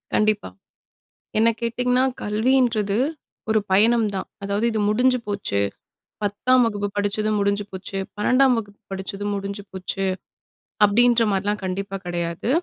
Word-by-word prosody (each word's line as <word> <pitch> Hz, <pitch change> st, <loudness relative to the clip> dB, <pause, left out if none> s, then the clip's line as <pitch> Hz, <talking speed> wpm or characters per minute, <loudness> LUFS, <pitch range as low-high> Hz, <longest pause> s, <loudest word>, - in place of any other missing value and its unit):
கண்டிப்பா. 215 Hz, -, +1 dB, 0.9 s
என்ன 225 Hz, +1 st, +5 dB
கேட்டிங்கன்னா 250 Hz, +2 st, +1 dB, 0.2 s
கல்வின்றது 220 Hz, -1 st, +2 dB, 0.5 s
ஒரு 220 Hz, -, +4 dB
பயணம் 225 Hz, +3 st, +4 dB
தான், 190 Hz, -, -3 dB, 0.2 s
அதாவது 200 Hz, +3 st, -1 dB
இது 220 Hz, -, 0 dB
முடிஞ்சு 250 Hz, +4 st, +3 dB
போச்சு, 200 Hz, -, -1 dB, 0.6 s
10ம் 230 Hz, +6 st, +3 dB
வகுப்பு 205 Hz, -2 st, -1 dB
படிச்சதும் 210 Hz, +1 st, 0 dB
முடிஞ்சு 200 Hz, 0 st, +1 dB
போச்சு, 190 Hz, +1 st, -6 dB, 0.2 s
12ம் 255 Hz, +4 st, +4 dB
வகுப்பு 205 Hz, -2 st, -7 dB
படிச்சதும் 195 Hz, +2 st, -4 dB
முடிஞ்சு 200 Hz, +1 st, -5 dB
போச்சு, 190 Hz, +1 st, -3 dB, 0.8 s
அப்படின்ற 235 Hz, +3 st, +4 dB
மாதிரிலாம் 205 Hz, +2 st, -1 dB
கண்டிப்பா 195 Hz, +1 st, -3 dB
கிடையாது. 170 Hz, +3 st, -3 dB
205 Hz, 120 wpm, -23 LUFS, 200-230 Hz, 0.9 s, என்ன